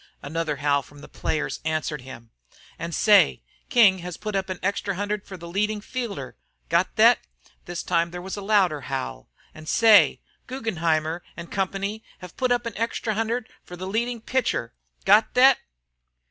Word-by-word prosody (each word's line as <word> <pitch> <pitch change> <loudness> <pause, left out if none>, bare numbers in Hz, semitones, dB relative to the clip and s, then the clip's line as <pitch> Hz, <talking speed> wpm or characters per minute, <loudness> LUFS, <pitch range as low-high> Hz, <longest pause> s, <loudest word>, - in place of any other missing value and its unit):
Another 155 0 -2
howl 140 0 +1
from 145 +1 -16
the - - -11
players 155 - -3
answered 155 -2 -2
him. 125 -3 -11 0.5
"An' 170 +1 -4
say, 205 +3 +4 0.3
King 210 -7 +5
has 180 -1 -7
put 210 -1 -5
up 190 0 -1
an 185 - -3
extra 200 0 -1
hundred 205 +1 -3
for 190 - -8
the 170 0 -10
leadin' 210 +4 -1
fielder. 210 - -5 0.3
Got - - +1
thet?" - - +6 0.5
This 175 0 -5
time 170 -1 +1
there 175 +1 -7
was 185 +2 -5
a 205 - -6
louder 195 -7 +2
howl." 60 - -4 0.2
An' 155 0 -12
say, 225 +1 +6 0.3
Guggenheimer 170 -10 -1 0.2
& 170 0 -8
Co. 195 +2 -2 0.2
have 180 -1 -11
put 255 -1 0
up 245 -1 +1
an 230 - -5
extra 230 0 -1
hundred 225 +2 -1 0.2
for 180 - -10
the 185 +1 -6
leadin' 230 +4 -2
pitcher. 240 - -1 0.3
Got 215 +2 +5
thet?" 260 +1 +7
190 Hz, 170 wpm, -25 LUFS, 160-215 Hz, 0.5 s, thet